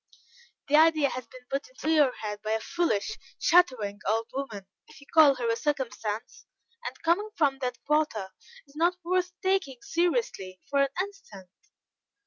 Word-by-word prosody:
"The 285 - +3
idea 310 -3 +5
has 255 -2 -6
been 255 0 -14
put 275 - -3
into 410 -10 -3
your 295 -5 +5
head 210 -3 -6
by 215 0 -1
a 220 - +1
foolish, 340 - -1 0.2
chattering 255 - +3
old 225 +2 0
woman, 230 -8 -5 0.2
if - - -16
you 285 - -16
call 305 -4 +7
her 245 -2 -2
a 230 - +2
circumstance, 235 -5 -3 0.4
and, - - -6
coming 355 +6 +2
from 275 -4 +2
that 250 -2 -3
quarter, 295 -11 0 0.3
is 280 - -22
not 340 +3 +2
worth 360 +1 0
taking 375 -10 0
seriously 335 - -1
for 280 -1 +3
an 275 - +3
instant." 205 - -12
275 Hz, 160 wpm, -28 LUFS, 225-335 Hz, 0.4 s, call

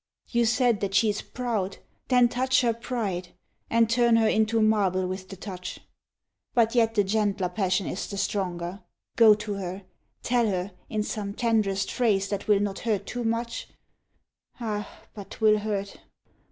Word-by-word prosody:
You 235 -1 +2
said 235 -1 +2
that 195 -1 -2
she 220 0 +4
is 205 - -4
proud; 220 -6 -3 0.3
then 250 -2 +5
touch 255 +2 +2
her 235 -2 +2
pride, 215 -7 -4 0.3
And 230 0 +4
turn 235 0 +3
her 225 -1 +4
into 220 +1 +2
marble 200 -4 +2
with 185 +1 -5
the 195 - -7
touch. 185 -1 -7 0.8
But 230 -2 +3
yet 225 -2 +2
the 205 - +4
gentler 200 -2 0
passion 185 0 0
is 190 - -4
the 200 - -6
stronger. 185 -1 -2 0.3
Go 220 -2 +7
to 210 0 -5
her, 190 0 -5 0.4
tell 240 -2 +2
her, 190 -1 -2 0.2
in 215 -1 -1
some 205 -1 -4
tenderest 215 -5 +1
phrase 200 -6 +1
That 200 -1 -3
will 205 -2 +4
not 200 -1 -2
hurt 210 -4 -1
too 245 +3 -4
much 230 0 -2 0.9
ah, 210 -3 -3 0.2
but 200 -2 -9
'twill 215 -1 +3
hurt! 205 -2 -3
210 Hz, 165 wpm, -26 LUFS, 195-230 Hz, 0.9 s, Go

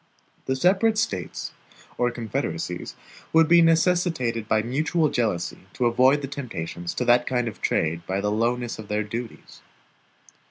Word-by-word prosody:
The 130 - +1
separate 195 +9 +3
States 95 - -2 0.4
or 120 - +1
confederacies 115 -3 -4 0.4
would 160 0 +6
be 170 +1 +6
necessitated 165 - +2
by 110 -1 +2
mutual 155 +6 +1
jealousy 100 -7 -2
to 125 - -1
avoid 130 +4 +4
the - - -2
temptations 85 -11 -5
to - - -1
that 120 0 +4
kind 125 -2 0
of 110 - -7
trade 85 +2 0
by 95 +1 -1
the 105 +1 -1
lowness 120 +2 -1
of 110 - -8
their 105 +1 -1
duties. 115 +2 -8
120 Hz, 150 wpm, -24 LUFS, 105-150 Hz, 0.4 s, would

